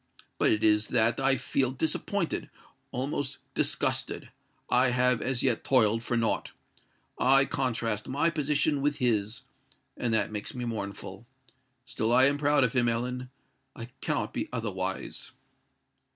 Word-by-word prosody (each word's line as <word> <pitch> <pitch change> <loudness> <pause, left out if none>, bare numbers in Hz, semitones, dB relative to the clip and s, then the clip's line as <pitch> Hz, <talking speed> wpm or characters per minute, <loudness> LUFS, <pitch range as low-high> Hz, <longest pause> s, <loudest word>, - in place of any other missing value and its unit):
But - - +4
it 105 - +1
is 105 0 +3
that 115 0 +2
I 135 0 +3
feel 135 -1 0
disappointed—almost 135 -1 -3 0.2
disgusted:—I 125 +1 -1
have 125 0 +2
as 130 -2 -1
yet 125 -4 +1
toiled 115 -4 +3
for 120 0 -1
naught! 115 -1 0 0.7
I 135 +2 +6
contrast 115 -7 -2
my 145 +5 +1
position 150 -1 0
with 145 +1 0
his—and 115 +1 -3
that 110 -2 +1
makes 105 +2 -5
me 125 -1 -4
mournful. 100 -1 -6 0.6
Still 110 -2 -1
I 130 +2 +6
am 140 +1 +2
proud 145 -1 +3
of 125 0 +2
him, 120 -2 +3
Ellen:—I 125 0 -6
cannot - - -2
be - - -3
otherwise." - - -4
125 Hz, 125 wpm, -28 LUFS, 115-135 Hz, 0.7 s, I